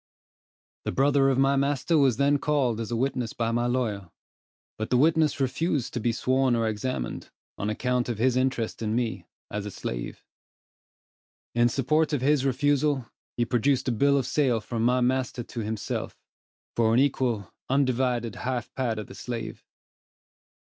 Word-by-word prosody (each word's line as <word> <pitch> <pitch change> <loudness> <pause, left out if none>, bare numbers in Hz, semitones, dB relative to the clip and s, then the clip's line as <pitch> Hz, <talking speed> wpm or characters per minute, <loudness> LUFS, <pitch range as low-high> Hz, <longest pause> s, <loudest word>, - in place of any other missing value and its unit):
The - - -2
brother 135 0 +3
of 135 - +1
my 135 +1 +3
master 140 +4 +1
was 135 -6 +4
then 140 +1 +3
called 135 -6 +1
as 115 - -4
a 120 - -1
witness 125 -1 -1
by 115 -1 -1
my 120 +1 +1
lawyer, 110 -7 -1 0.7
but 110 +1 -3
the 125 - +3
witness 155 +1 +3
refused 140 +1 -1
to 125 - -2
be 120 +1 +1
sworn 130 +2 +1
or 115 -1 +1
examined, 110 - -3 0.3
on 105 - -3
account 125 +3 0
of 120 - -2
his 125 +3 +2
interest 130 -4 -1
in 110 0 -1
me, 110 -8 -2 0.2
as 105 0 -3
his 105 - -7
slave. - - -5 1.3
In 120 0 +4
support 155 +5 +1
of 140 - 0
his 140 0 +2
refusal, 140 0 +1 0.3
he 120 - +2
produced 130 +3 +1
a - - +1
bill 140 +5 +3
of 135 - 0
sale 130 -4 +2
from 115 +1 -3
my 125 +2 +3
master 125 -1 0
to 115 - -7
himself, 110 -1 -4 0.6
for 115 -1 +3
an - - +5
equal, 125 -7 0 0.2
undivided 125 -4 +1
half 125 -2 -3
part 120 -4 -1
of 105 - -4
the - - -12
slave 120 -2 -6
125 Hz, 170 wpm, -26 LUFS, 115-135 Hz, 1.3 s, an